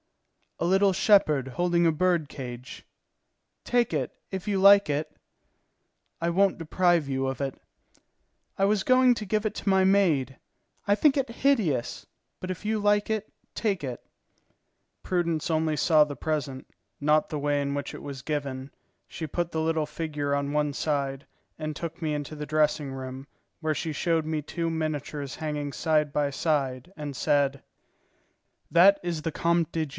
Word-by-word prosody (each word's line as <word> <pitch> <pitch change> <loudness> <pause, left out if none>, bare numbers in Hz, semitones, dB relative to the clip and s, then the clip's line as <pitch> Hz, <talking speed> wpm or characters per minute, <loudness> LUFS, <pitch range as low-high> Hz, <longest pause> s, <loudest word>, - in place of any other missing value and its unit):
"A - - -2
little 195 +2 +4
shepherd 155 - +3
holding 175 +6 +1
a - - +4
bird 170 -1 +1
cage." 125 -2 -8 0.8
"Take 240 -6 +1
it, 135 -5 -1 0.2
if 190 +1 -5
you 200 -2 +1
like 200 -1 +7
it." 150 +2 -3 1.0
"I 170 +1 0
won't 195 +3 +2
deprive 170 -1 +2
you 135 0 -1
of 135 +1 -3
it." 135 -1 -3 1.0
"I 195 - +4
was 205 -1 +2
going 255 -1 +5
to 215 - -5
give 210 +2 0
it 215 - -1
to - - -2
my 190 -1 +4
maid. 170 -10 +2 0.5
I 200 - +4
think 285 +7 +3
it 270 -2 0
hideous; 220 - 0 0.3
but 185 - -4
if 185 - -7
you 215 +1 0
like 205 0 +2
it, 215 -1 -2 0.2
take 200 -8 -1
it." 125 -3 -5 1.0
Prudence 170 -3 -1
only 160 -1 +1
saw 155 -2 +5
the 145 -1 -5
present, 145 -4 -3 0.3
not 150 +1 +2
the 150 - -3
way 145 0 +1
in 140 0 -2
which 140 0 -4
it - - -9
was 140 -2 -7
given. 140 -2 -4 0.4
She 160 - -6
put 175 +3 -3
the 160 - -1
little 160 -1 0
figure 150 -2 -2
on 140 0 -2
one 150 -1 0
side, 140 -2 -2 0.3
and 155 -1 -4
took 165 +2 -6
me 155 -1 0
into 150 +1 -4
the 150 0 -5
dressing 150 -2 +1
room, 130 0 -7 0.4
where 155 -1 0
she 160 +1 -3
showed 165 0 0
me 155 -1 -2
two 165 +3 -3
miniatures 150 -3 -3
hanging 150 -2 -4
side 155 -3 +1
by 145 -1 +1
side, 135 -1 -1
and 145 -3 -6
said: 140 0 +1 1.1
"That 195 +4 +6
is 170 -3 -3
the 165 - -2
Comte 170 +1 +1
de 160 -1 -1
G. - - -15
155 Hz, 170 wpm, -27 LUFS, 145-180 Hz, 1.1 s, like